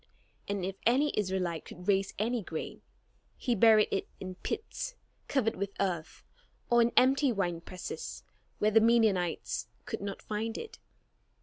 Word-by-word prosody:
And 200 -2 -1
if 195 +1 -4
any 270 +6 +3
Israelite 185 -5 -1
could 180 +1 -11
raise 195 -1 +2
any 230 +3 0
grain, 165 -4 -6 0.6
he 245 - 0
buried 220 0 +6
it 195 - -1
in 185 -1 -5
pits 475 - -4 0.3
covered 245 -5 +1
with 200 0 -2
earth, 175 -5 -2 0.5
or 240 0 +6
in 235 0 +3
empty 270 +2 +5
winepresses, 180 -3 -4 0.3
where 215 - +2
the 225 +1 +6
Midianites 220 -7 +2 0.2
could - - -4
not 200 -1 -5
find 220 +2 -3
it. 455 - -8
210 Hz, 140 wpm, -31 LUFS, 185-235 Hz, 0.6 s, buried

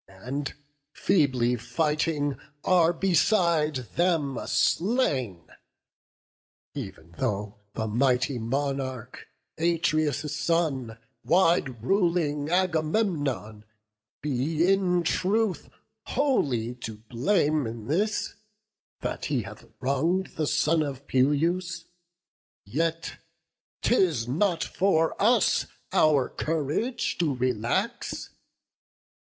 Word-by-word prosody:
And, 125 +10 -5 0.4
feebly 130 -9 +2
fighting, 145 +4 -1 0.2
are 175 -2 +4
beside 170 -3 +2
them 145 +1 0
slain. 135 - +1 1.3
E'en 85 +1 -8
though 105 -5 -2 0.2
the 110 - -1
mighty 125 +3 +1
monarch, 130 0 -3 0.3
Atreus' 155 -3 +1
son, 145 -8 0 0.3
Wide 165 - +2
ruling 170 - +1
Agamemnon, 160 - 0 0.6
be 150 +4 0
in 185 -2 +2
truth 195 +4 0 0.4
Wholly 135 - +1
to 110 -3 -6
blame 145 - +1
in 110 -1 -7
this, 205 - 0 0.7
that - - -3
he 135 -6 0
hath - - -11
wrong'd 160 +8 0
The 155 -2 -1
son 150 +3 +2
of 140 -2 -4
Peleus, 165 +7 +1 0.8
yet 165 +9 -2 0.6
'tis 165 - +2
not 170 +6 +1
for 165 -4 +1
us 225 0 +3 0.3
Our 155 -7 +4
courage 160 - -2
to 155 -6 +1
relax. 125 - -2
150 Hz, 85 wpm, -27 LUFS, 130-175 Hz, 1.3 s, are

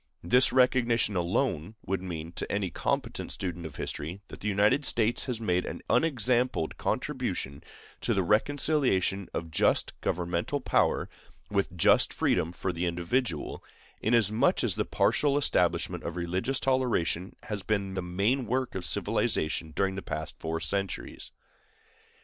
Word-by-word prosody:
This 125 +9 +4
recognition 120 -4 +3
alone 90 - 0
would 95 0 -1
mean, 85 -3 -5
to - - -5
any 100 -3 -1
competent - - -2
student 85 -3 -4
of 75 - -12
history, 85 +6 -4
that - - -10
the 105 - -4
United 105 +7 +3
States 115 -3 +1
had 125 -4 -2
made 90 -5 +1
an - - -6
unexampled 125 - +1
contribution 70 +2 -2 0.4
to - - 0
the 95 - +2
reconciliation 105 - +2
of 80 -1 -4
just - - +2
governmental 90 - -1
power - - +1 0.4
with - - -1
just - - +4
freedom 80 - +1
for 90 +1 -3
the 85 +2 -1
individual, 85 - -2 0.4
inasmuch 110 -1 +3
as - - +2
the - - -1
partial 145 -1 +2
establishment 145 - +1
of 85 - -4
religious 90 +10 -1
toleration 120 -9 0
has 105 -2 -4
been 100 -1 -1
the 95 - -2
main 100 +9 0
work 130 +1 -1
of 95 - -4
civilization 80 +1 0
during 95 +4 0
the 95 - -5
past - - -5
four 80 0 -2
centuries. 95 +4 -3
95 Hz, 145 wpm, -29 LUFS, 85-120 Hz, 0.4 s, This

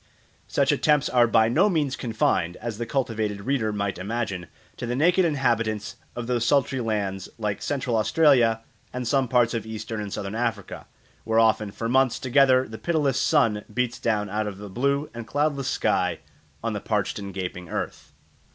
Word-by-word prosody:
Such - - +2
attempts 150 -1 +2
are 120 -2 +4
by 110 -1 +4
no 190 - +3
means 150 -7 0
confined, 110 -7 0
as 115 -1 -5
the 120 - -3
cultivated 110 -6 -1
reader 120 -2 0
might 100 -2 -2
imagine, 100 -3 -3 0.3
to 120 - -4
the 120 - -1
naked 175 +6 +3
inhabitants 115 -7 0 0.2
of 120 - -4
those 120 -1 0
sultry 135 0 +2
lands 100 -4 -2
like 105 -3 -2
Central 130 -4 -1
Australia 115 -1 +4 0.3
and 125 -1 -4
some 135 +1 +2
parts 120 -1 +3
of 115 - -2
Eastern 110 0 -5
and 105 -1 -5
Southern 100 +1 -4
Africa, 115 -3 -3 0.4
where 110 0 0
often 110 -2 +3
for 115 +3 -4
months 130 0 +3
together 130 0 +4
the 110 0 -9
pitiless 150 -6 +1
sun 115 -9 +2
beats 125 +1 -1
down 105 -3 0
out 105 +1 -2
of 100 -2 -6
a 105 0 -8
blue 140 +7 0
and 120 -1 -7
cloudless 145 -1 0
sky - - +1 0.5
on - - -1
the - - -4
parched - - -1
and 100 -1 -6
gaping 90 -2 -5
earth. - - -5
115 Hz, 180 wpm, -25 LUFS, 105-130 Hz, 0.5 s, are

